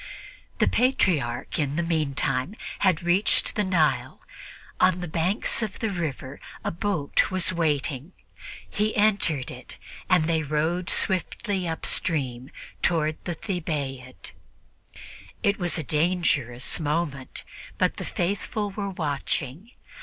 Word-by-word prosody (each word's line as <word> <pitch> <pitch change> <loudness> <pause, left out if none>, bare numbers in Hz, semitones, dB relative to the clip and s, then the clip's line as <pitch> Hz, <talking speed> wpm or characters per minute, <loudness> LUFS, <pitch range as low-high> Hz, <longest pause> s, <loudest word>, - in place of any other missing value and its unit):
The - - +3
Patriarch, 165 - +1
in 145 -1 0
the 170 - +1
meantime, 155 0 0 0.2
had 185 -5 +3
reached 175 +4 +3
the 210 - +1
Nile; 165 -7 +1 0.6
on 185 -1 +4
the 175 - -4
banks 170 +9 +1
of 215 -3 -3
the 220 - -1
river 145 -6 -4 0.2
a - - -1
boat 170 -4 +1
was 185 0 +2
waiting; 150 -1 -1 0.5
he 215 +1 -1
entered 200 -10 +2
it, - - -11 0.3
and 180 -3 +5
they 160 0 +1
rowed 160 +4 0
swiftly 190 0 +1
upstream 140 -6 -1 0.3
toward 155 -2 +2
the 175 - -2
Thebaid. 145 -9 -4 1.1
It 200 0 +2
was 175 -2 +1
a 160 - -2
dangerous 150 -6 +1
moment, 150 -3 -2 0.3
but - - +1
the - - -4
faithful 205 +3 -2
were 200 0 -3
watching. 150 - -3
165 Hz, 120 wpm, -26 LUFS, 145-185 Hz, 1.1 s, and